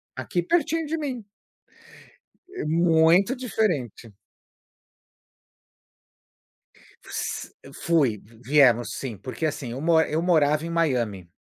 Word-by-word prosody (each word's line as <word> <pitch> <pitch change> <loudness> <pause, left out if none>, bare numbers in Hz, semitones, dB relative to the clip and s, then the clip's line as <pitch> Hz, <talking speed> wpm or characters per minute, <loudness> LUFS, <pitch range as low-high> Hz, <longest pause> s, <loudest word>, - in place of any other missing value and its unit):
Aqui 180 - -2
pertinho 330 - 0
de 325 +2 -2
mim. 260 -7 -5 1.3
É 385 - -5
muito 165 - +3
diferente. 175 - -2 3.0
S - - -4 0.3
fui 150 -10 +2
v 110 +3 -20
viemos 125 -5 +4
sim, 120 -6 -6
porque, 130 - -5
assim, 140 -5 -5
eu 130 +3 -6
mo 165 0 +3
eu 160 0 -1
morava 155 -3 +2
em - - -5
Miami 120 - -1
160 Hz, 105 wpm, -24 LUFS, 125-180 Hz, 3.0 s, viemos